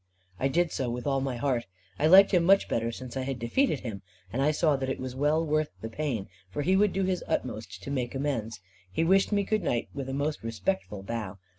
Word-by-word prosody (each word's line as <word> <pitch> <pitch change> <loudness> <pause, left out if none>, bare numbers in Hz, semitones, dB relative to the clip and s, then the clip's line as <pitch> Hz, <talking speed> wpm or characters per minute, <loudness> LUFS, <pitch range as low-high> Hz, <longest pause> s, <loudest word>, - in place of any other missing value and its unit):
I 135 - +2
did 170 +5 +1
so 130 -2 -2
with 120 +1 -4
all 135 -2 +1
my 135 -2 -2
heart. 120 -2 0 0.3
I 150 - +4
liked 195 +4 +8
him 180 -3 +4
much 195 +3 +5
better 115 0 -1
since 125 +1 -8
I 135 - -1
had 135 0 -3
defeated 145 - +1
him; 110 -5 -5 0.3
and 130 - 0
I 145 - +4
saw 155 -1 +2
that 135 -1 -2
it - - -2
was 130 -1 -5
well 150 +4 +2
worth 155 0 +1
the 110 - -5
pain, 120 -5 -2 0.2
for 145 +9 -3
he 185 +5 +3
would 205 0 +4
do 195 - 0
his 185 -1 0
utmost 100 -7 -3
to 140 - -5
make 125 -2 -2
amends. 120 -6 -2 0.3
He 160 - 0
wished 190 +5 +4
me 200 -1 +2
good 215 +1 0
night 120 -8 -1
with 135 -2 -5
a - - -3
most 145 +2 -1
respectful 115 - -3
bow. 105 -3 -4
135 Hz, 240 wpm, -28 LUFS, 120-165 Hz, 0.3 s, liked